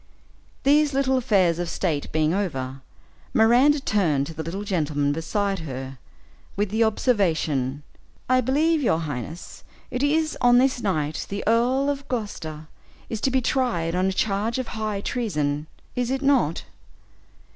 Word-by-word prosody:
These 290 0 +4
little 265 -1 +2
affairs 195 -9 +2
of 175 -1 -2
state 155 -6 -2
being 155 +1 +1
over, 135 -9 -3 0.5
Miranda 245 +7 +5
turned 170 - +1
to 165 - -7
the 160 - -5
little 175 +6 -4
gentleman 150 -7 0
beside 195 +5 -1
her, 135 -4 -6 0.6
with 205 0 -1
the 220 +2 +3
observation, 160 - +1 0.4
"I 255 0 +4
believe, 300 +6 +2
your 165 - +2
highness, 150 +2 -6 0.3
it 250 - -2
is 310 +2 +1
on 245 0 +6
this 255 -1 +2
night 155 -7 -1
the 200 0 -4
Earl 245 +5 +2
of 280 -1 -2
Gloucester 160 -10 -5 0.4
is 220 -2 -3
to - - +2
be 260 0 +1
tried 230 -12 0
on 185 +1 +1
a - - +1
charge 210 +4 0
of 255 -2 -3
high 215 -2 -3
treason, 150 - -2 0.3
is 245 -1 -1
it 270 +1 -1
not?" 265 - +2
205 Hz, 150 wpm, -24 LUFS, 160-255 Hz, 0.6 s, on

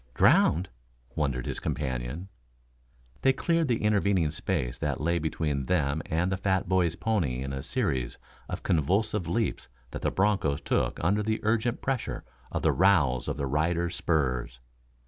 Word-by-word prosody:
"Drowned?" 90 +8 +4 0.5
wondered 70 -5 -1
his - - -2
companion. 65 +5 -3 0.9
They 135 - +4
cleared 165 +3 +1
the 115 -4 0
intervening 100 -6 +2
space 75 -6 -2
that - - -1
lay 85 +4 +1
between 75 -3 -2
them 80 -4 +1
and 85 +4 0
the 95 - 0
fat 95 -1 0
boy's 90 -3 +2
pony 80 - 0
in 70 0 -4
a 65 - -3
series 65 -2 -1 0.3
of - - -5
convulsive 95 +5 +1
leaps 115 -4 -1 0.2
that - - -6
the - - +1
bronchos 95 -8 +1
took - - 0
under 100 +5 +2
the 110 +1 -1
urgent 115 +2 0
pressure 130 -3 -2 0.3
of - - -2
the - - +4
rowels 80 -10 +3
of - - -2
their 70 - -1
riders' 85 +5 0
spurs. 65 -7 -1
85 Hz, 155 wpm, -28 LUFS, 70-100 Hz, 0.9 s, Drowned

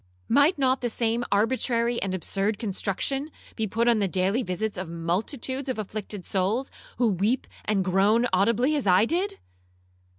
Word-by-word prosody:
Might 295 +5 +4
not 260 -1 +2
the 240 - -1
same 230 +1 0
arbitrary 235 +2 +1
and 190 -1 -1
absurd 200 +3 -1
construction 220 +7 -2 0.3
be 220 -2 -1
put 230 +4 0
on 235 -2 +4
the 200 - +1
daily 190 +6 +1
visits 200 +1 -3
of 180 -2 -5
multitudes 225 - -2
of 255 - -2
afflicted 210 -2 -4
souls, 205 +8 -1 0.3
who 240 -2 +3
weep 205 +7 0 0.2
and 195 -3 +1
groan 200 +5 +3
audibly 230 +9 +3
as 280 -8 -1
I 185 +3 +5
did? 380 - -1
220 Hz, 160 wpm, -26 LUFS, 195-250 Hz, 0.3 s, I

